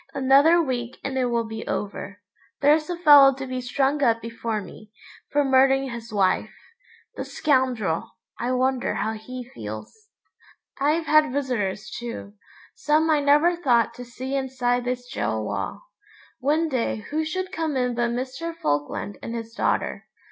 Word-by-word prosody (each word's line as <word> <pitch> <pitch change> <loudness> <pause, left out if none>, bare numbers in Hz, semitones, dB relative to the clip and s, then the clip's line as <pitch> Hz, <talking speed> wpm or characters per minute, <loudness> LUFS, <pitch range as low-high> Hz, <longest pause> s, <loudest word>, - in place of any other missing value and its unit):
Another 280 +6 +5
week 250 -6 -2
and 270 -1 -3
it 255 -1 +1
will 235 -1 0
be 220 0 -7
over. 205 0 -4 0.4
There's 300 +3 +3
a 350 - -2
fellow 285 -5 +8
to 270 0 -6
be 255 -1 -4
strung 270 +3 0
up 230 -4 +3
before 230 -1 -3
me, 210 +2 -12 0.4
for 290 0 +2
murdering 270 0 +3
his 235 -1 -8
wife. 195 -3 +1 0.7
The - - -2
scoundrel, 255 - 0 0.3
I 245 +2 -1
wonder 255 -3 0
how 220 +2 -1
he 250 +3 -7
feels? 110 - -8 0.7
I've 305 +4 +1
had 305 -2 +4
visitors 240 -8 -2
too; 235 -4 -6 0.4
some 310 +2 +2
I 305 - +4
never 295 +5 +4
thought 245 -9 +2
to 245 - -9
see 255 +3 -5
inside 250 -2 0
this 245 0 -3
gaol 110 +1 -1
wall. - - -4 0.6
One 305 +5 +1
day 235 -6 -2
who 310 +1 0
should 370 +4 -3
come 320 -5 -2
in 250 -1 0
but 240 0 0
Mr. 260 +7 -4
Falkland 145 - -2
and 230 - -5
his 230 0 -6
daughter. - - -1
255 Hz, 155 wpm, -24 LUFS, 230-290 Hz, 0.7 s, fellow